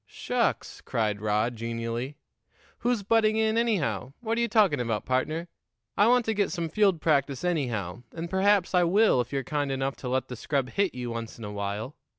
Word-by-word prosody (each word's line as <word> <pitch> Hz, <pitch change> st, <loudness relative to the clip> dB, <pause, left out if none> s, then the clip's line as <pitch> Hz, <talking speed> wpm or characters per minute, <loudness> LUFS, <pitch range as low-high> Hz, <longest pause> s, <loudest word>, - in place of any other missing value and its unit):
"Shucks!" -, -, -2 dB
cried 105 Hz, -3 st, -1 dB
Rod 110 Hz, +3 st, 0 dB
genially. 115 Hz, +4 st, -4 dB, 0.6 s
"Who's 240 Hz, -4 st, 0 dB
butting 215 Hz, +1 st, +3 dB
in, 220 Hz, 0 st, +2 dB
anyhow? 205 Hz, -, 0 dB
What 225 Hz, -1 st, -1 dB
are 235 Hz, -, 0 dB
you 235 Hz, -, +2 dB
talking 205 Hz, -, +3 dB
about, 115 Hz, -3 st, -2 dB
partner? 155 Hz, +7 st, -1 dB, 0.5 s
I 205 Hz, -, +4 dB
want 245 Hz, 0 st, +4 dB
to 220 Hz, -, +1 dB
get 205 Hz, -2 st, 0 dB
some 170 Hz, -3 st, -2 dB
field 195 Hz, -2 st, +2 dB
practice 140 Hz, -3 st, +1 dB
anyhow, 120 Hz, -, -1 dB
and 165 Hz, +1 st, -5 dB
perhaps 190 Hz, +1 st, +2 dB
I 180 Hz, -1 st, +5 dB
will 190 Hz, -, +4 dB
if 120 Hz, -, -7 dB
you're 135 Hz, -1 st, -1 dB
kind 145 Hz, +1 st, -1 dB
enough 135 Hz, 0 st, -1 dB
to 125 Hz, -, -5 dB
let 130 Hz, 0 st, 0 dB
the 125 Hz, -, -6 dB
scrub 130 Hz, +1 st, -1 dB
hit 200 Hz, -1 st, 0 dB
you 125 Hz, -1 st, -4 dB
once 115 Hz, -1 st, -6 dB
in 115 Hz, -, -10 dB
a 105 Hz, -, -5 dB
while. 100 Hz, +6 st, -4 dB
145 Hz, 195 wpm, -27 LUFS, 120-200 Hz, 0.6 s, I